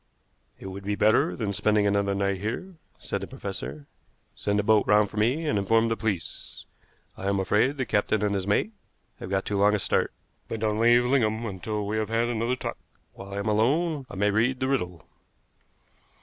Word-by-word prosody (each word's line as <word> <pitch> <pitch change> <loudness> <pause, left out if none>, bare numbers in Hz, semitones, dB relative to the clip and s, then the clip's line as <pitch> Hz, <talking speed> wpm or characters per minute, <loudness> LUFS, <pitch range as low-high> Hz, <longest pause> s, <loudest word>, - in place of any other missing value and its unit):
"It - - -12
would 95 +1 -7
be 105 +1 -1
better 105 -4 +3
than 100 +1 -2
spending 105 +1 +2
another 100 -1 +1
night 100 -1 -1
here," 125 - -4 0.2
said - - -4
the - - -5
professor. 70 +4 -7 0.5
"Send 100 0 -1
a - - +1
boat 110 0 +3
round 105 0 +4
for - - -9
me, 125 +10 +1
and 105 -9 +1
inform 115 +3 +2
the 115 - +1
police. 95 -9 -4 0.5
I 95 - -5
am 100 0 +1
afraid 110 +9 +2
the 130 - -1
captain 105 -1 +1
and 105 -1 +1
his 95 -1 -2
mate 105 - +1 0.5
have - - -7
got 95 0 0
too 100 -1 -1
long 105 +1 +4
a - - 0
start; - - +1 0.4
but 115 - -4
don't 105 -1 0
leave 120 +1 +5
Lingham 115 -3 +1
until 105 +1 -3
we 105 +2 -2
have 110 -1 -1
had 115 +1 +1
another 120 +2 0
talk. - - -5 0.3
While 100 0 -9
I - - -4
am 100 +2 -3
alone 135 +7 +1
I - - -8
may 105 +2 +2
read 120 +5 +1
the 130 - 0
riddle." 90 - -2
105 Hz, 205 wpm, -26 LUFS, 100-115 Hz, 0.5 s, leave